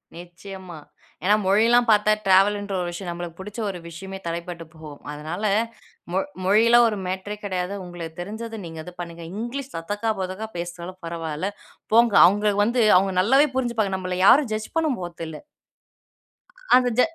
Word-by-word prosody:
நிச்சயமா. 180 Hz, 0 st, -10 dB, 0.5 s
ஏன்னா 205 Hz, +3 st, +5 dB
மொழியிலாம் 230 Hz, +5 st, +4 dB
பார்த்தா 210 Hz, 0 st, +5 dB
ட்ராவல்ன்ற 200 Hz, +1 st, +3 dB
ஒரு 175 Hz, -, -2 dB
விஷயம், 175 Hz, +1 st, -6 dB
நம்மளுக்கு 170 Hz, -1 st, -7 dB
பிடிச்ச 210 Hz, +4 st, -8 dB
ஒரு 180 Hz, -2 st, -5 dB
விஷயமே 190 Hz, +3 st, -8 dB
தடைப்பட்டு 170 Hz, 0 st, -5 dB
போகும். 155 Hz, -2 st, -11 dB
அதனால, 155 Hz, +7 st, -6 dB, 0.7 s
மொ 190 Hz, -, +2 dB, 0.3 s
மொழிலாம் 230 Hz, +4 st, +6 dB
ஒரு 210 Hz, -, -3 dB
மேட்டரே 190 Hz, +3 st, -4 dB
கிடையாது. 185 Hz, 0 st, -2 dB
உங்களுக்கு 175 Hz, -2 st, -8 dB
தெரிஞ்சது 225 Hz, +4 st, -6 dB
நீங்க 165 Hz, -1 st, -8 dB
இது 180 Hz, -, -10 dB
பண்ணுங்க. 170 Hz, -1 st, -7 dB, 0.2 s
இங்கிலீஷ் 260 Hz, +3 st, -5 dB
தத்தக்கா, 205 Hz, +7 st, -2 dB
பொதக்கா 190 Hz, +4 st, -4 dB
பேசினாலும் 175 Hz, +1 st, -7 dB
பரவால்ல. 165 Hz, +2 st, -3 dB, 0.4 s
போங்க. 235 Hz, -2 st, +5 dB
அவுங்க 205 Hz, +2 st, +3 dB
வந்து 240 Hz, +2 st, +1 dB, 0.2 s
அவுங்க 190 Hz, 0 st, +1 dB
நல்லாவே 270 Hz, +9 st, +5 dB
புரிஞ்சுப்பாங்க. 230 Hz, -6 st, 0 dB
நம்பள 185 Hz, -1 st, -3 dB
யாரும் 260 Hz, +1 st, +6 dB
ஜட்ஜ் 215 Hz, 0 st, -4 dB
பண்ண 320 Hz, -1 st, +2 dB
போறது 175 Hz, -1 st, -6 dB
இல்லை. 155 Hz, -, -9 dB, 1.3 s
அந்த 250 Hz, -1 st, +4 dB
ஜ -, -, +8 dB
190 Hz, 150 wpm, -24 LUFS, 175-220 Hz, 1.3 s, ஜ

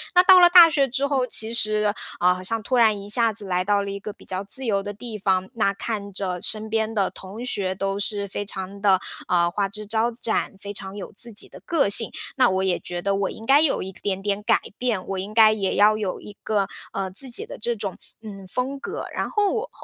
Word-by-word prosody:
那 360 Hz, -, +7 dB
到 370 Hz, 0 st, +8 dB
了 350 Hz, -1 st, +8 dB
大 350 Hz, -1 st, +10 dB
学 285 Hz, -4 st, +2 dB
之 270 Hz, +3 st, 0 dB
后 270 Hz, -3 st, 0 dB
其 225 Hz, -1 st, +1 dB
实 215 Hz, -2 st, +1 dB, 0.3 s
啊， 180 Hz, +1 st, +4 dB
好 180 Hz, -, -7 dB
像 220 Hz, +4 st, -2 dB
突 255 Hz, -, -1 dB
然 220 Hz, -4 st, +4 dB
一 200 Hz, -, -9 dB
下 230 Hz, +2 st, +3 dB
子 210 Hz, -1 st, -7 dB
来 180 Hz, -1 st, 0 dB
到 200 Hz, +1 st, +1 dB
了 200 Hz, -, -4 dB
一 200 Hz, -, -5 dB
个 210 Hz, -, -6 dB
比 -, -, -18 dB
较 185 Hz, +1 st, -2 dB
自 255 Hz, +6 st, -2 dB
由 200 Hz, -4 st, +1 dB
的 205 Hz, +1 st, -6 dB
地 220 Hz, +1 st, -7 dB
方， 190 Hz, -2 st, 0 dB
那 200 Hz, -3 st, +1 dB
看 200 Hz, -1 st, -4 dB
着 185 Hz, -2 st, -2 dB
身 220 Hz, 0 st, +1 dB
边 220 Hz, 0 st, -1 dB
的 200 Hz, -3 st, +1 dB
同 205 Hz, +6 st, -9 dB
学 190 Hz, -6 st, -1 dB
都 195 Hz, +1 st, -2 dB
是 205 Hz, 0 st, -2 dB
非 205 Hz, +1 st, -5 dB
常 195 Hz, 0 st, -6 dB
地， 195 Hz, -2 st, +4 dB, 0.3 s
呃， 170 Hz, -1 st, +2 dB
花 200 Hz, +2 st, 0 dB
枝 210 Hz, +2 st, -6 dB
招 225 Hz, +3 st, 0 dB
展， 225 Hz, -3 st, -2 dB
非 200 Hz, 0 st, -7 dB
常 190 Hz, 0 st, -6 dB
有 205 Hz, -, -7 dB
自 225 Hz, +2 st, -4 dB
己 205 Hz, -, -3 dB
的 -, -, -12 dB
个 310 Hz, -10 st, +2 dB
性， 220 Hz, +3 st, +4 dB, 0.3 s
那 255 Hz, -2 st, +5 dB
我 190 Hz, 0 st, 0 dB
也 185 Hz, -2 st, 0 dB
觉 175 Hz, 0 st, -5 dB
得 200 Hz, +2 st, 0 dB
我 195 Hz, 0 st, -1 dB
应 225 Hz, -, -9 dB
该 275 Hz, +4 st, +6 dB
有 315 Hz, -, +2 dB
一 190 Hz, -, -6 dB
点 195 Hz, 0 st, -4 dB
点 200 Hz, 0 st, -1 dB
改 -, -, +3 dB, 0.2 s
变， 230 Hz, -7 st, -1 dB
我 195 Hz, -1 st, -3 dB
应 200 Hz, +3 st, -6 dB
该 220 Hz, -1 st, +7 dB
也 200 Hz, -3 st, -1 dB
要 210 Hz, +1 st, +5 dB
有 205 Hz, -4 st, -3 dB
一 210 Hz, -, -10 dB
个， 205 Hz, -3 st, 0 dB, 0.3 s
呃， 195 Hz, -1 st, -3 dB
自 260 Hz, +8 st, -3 dB
己 240 Hz, -, +1 dB
的 -, -, -9 dB
这 235 Hz, +2 st, -1 dB
种， 200 Hz, -4 st, -5 dB, 0.2 s
嗯， 200 Hz, -3 st, -10 dB
风 255 Hz, +7 st, -3 dB
格。 405 Hz, -, -5 dB
然 -, -, -2 dB
后 410 Hz, -2 st, +1 dB
我 475 Hz, +2 st, -3 dB
205 Hz, 270 characters per minute, -23 LUFS, 195-230 Hz, 0.3 s, 大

